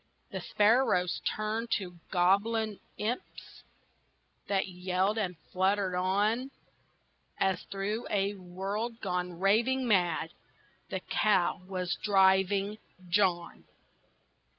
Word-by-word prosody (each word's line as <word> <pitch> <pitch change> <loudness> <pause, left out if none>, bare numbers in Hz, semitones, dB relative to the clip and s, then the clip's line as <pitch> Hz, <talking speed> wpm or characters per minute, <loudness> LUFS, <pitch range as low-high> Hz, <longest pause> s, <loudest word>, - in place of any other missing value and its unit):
The - - -4
sparrows 205 -5 +2
turned 215 +2 -2
to 180 -3 -8
goblin 205 +4 +2 0.2
imps 225 +4 -5 0.9
That 195 -1 +1
yelled, 185 +3 0
and 180 -5 -2 0.2
fluttered 190 0 +1
on, 205 +8 +1 0.9
As 190 -2 +1
through 205 +4 -3
a 200 0 +1
world, 200 +5 -4
gone 180 -2 -3
raving 235 +7 +2
mad, 175 -6 +2 0.6
The - - -3
cow 190 -4 +1
was 180 -2 -2
driving 195 +1 +3 0.3
John! 175 -2 +1
195 Hz, 95 wpm, -30 LUFS, 180-215 Hz, 0.9 s, driving